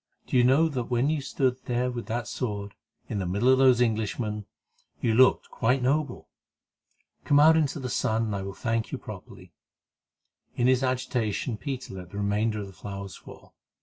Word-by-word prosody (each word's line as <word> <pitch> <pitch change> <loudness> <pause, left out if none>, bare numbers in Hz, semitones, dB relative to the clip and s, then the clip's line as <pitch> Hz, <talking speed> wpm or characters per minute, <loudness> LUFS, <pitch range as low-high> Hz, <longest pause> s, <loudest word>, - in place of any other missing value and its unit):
Do - - -4
you 125 - +6
know 135 +6 +5
that 130 -6 -3
when 125 +5 +1
you 155 -2 -1
stood 130 -2 -1
there 125 +1 0
with 120 -1 -6
that 120 0 -3
sword, 100 -5 -4 0.3
in 105 - -3
the 95 - -2
middle 100 +8 +1
of 130 0 +5
those 130 -2 +5
Englishmen, 105 -1 -2 0.5
you 115 - +1
looked 130 +3 +4
quite 125 +2 +1
noble? 140 0 0 1.0
Come 145 - +4
out 160 +2 +7
into 155 -1 +1
the 130 - -4
sunlight, 115 -2 0
and 105 -2 -2
I 100 - -3
will 95 0 -6
thank 115 -1 -2
you - - -3
properly." - - -11 1.0
In 120 - +1
his 130 0 +4
agitation 125 -3 -1
Peter 130 +1 -6
let 90 -2 -8
the 100 - -8
remainder 105 +1 0
of - - -5
the 95 - -12
flowers 100 -1 -7
fall. - - -14
120 Hz, 185 wpm, -27 LUFS, 105-130 Hz, 1.0 s, out